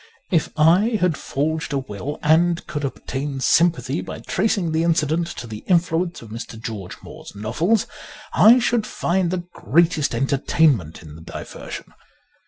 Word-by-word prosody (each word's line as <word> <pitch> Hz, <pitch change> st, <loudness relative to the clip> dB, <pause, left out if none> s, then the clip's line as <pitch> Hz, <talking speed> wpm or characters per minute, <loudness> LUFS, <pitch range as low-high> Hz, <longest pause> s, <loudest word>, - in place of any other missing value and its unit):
If 165 Hz, -4 st, +2 dB
I 185 Hz, +9 st, +4 dB
had 180 Hz, -3 st, +2 dB
forged 150 Hz, +3 st, -2 dB
a -, -, +1 dB
will, 130 Hz, +3 st, -5 dB
and 170 Hz, +3 st, +3 dB
could 150 Hz, -2 st, -4 dB
obtain 135 Hz, 0 st, -4 dB
sympathy 150 Hz, -1 st, +2 dB
by -, -, -7 dB
tracing 200 Hz, -6 st, 0 dB
the 160 Hz, +1 st, +1 dB
incident 165 Hz, 0 st, +1 dB
to -, -, -6 dB
the 110 Hz, -2 st, -8 dB
influence 170 Hz, -3 st, +1 dB
of 110 Hz, -, -12 dB
Mr. 115 Hz, 0 st, -7 dB
George 105 Hz, -5 st, -6 dB
Moore's -, -, -11 dB
novels, 160 Hz, -, 0 dB, 0.5 s
I 230 Hz, +4 st, +7 dB
should 235 Hz, -3 st, +1 dB
find 175 Hz, 0 st, 0 dB
the 180 Hz, 0 st, -2 dB
greatest 160 Hz, -, +2 dB
entertainment 135 Hz, -, +1 dB
in 75 Hz, -2 st, -11 dB
the 80 Hz, -, -12 dB
diversion. -, -, -8 dB
160 Hz, 150 wpm, -22 LUFS, 130-175 Hz, 0.5 s, I